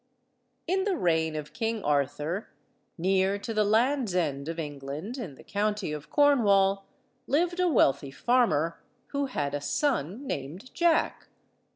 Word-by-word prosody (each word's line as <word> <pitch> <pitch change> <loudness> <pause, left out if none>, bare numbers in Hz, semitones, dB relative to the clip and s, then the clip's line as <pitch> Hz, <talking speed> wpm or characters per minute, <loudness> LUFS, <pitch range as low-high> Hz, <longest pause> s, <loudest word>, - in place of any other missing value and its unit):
] - - -47 0.2
In 380 +2 +1
the 400 -2 0
reign 160 - +1
of 150 -1 -6
King 225 -2 -2
Arthur, 145 +6 -1 0.5
near 190 +3 +2
to 225 +3 -5
the 215 -1 +3
Land's 225 0 +2
End 145 -4 -1
of 165 - -4
England, 145 - -5
in 180 - -6
the - - -15
County 210 -3 -1
of 150 0 -6
Cornwall, 200 -9 +3 0.4
lived 345 +5 +1
a 365 - +3
wealthy 140 - +3
farmer, 165 - +1 0.3
who 280 -1 -1
had 145 - -2
a 145 - -2
son 240 - -1
named 165 - -6
Jack. 340 -2 +1
195 Hz, 150 wpm, -28 LUFS, 150-250 Hz, 0.5 s, the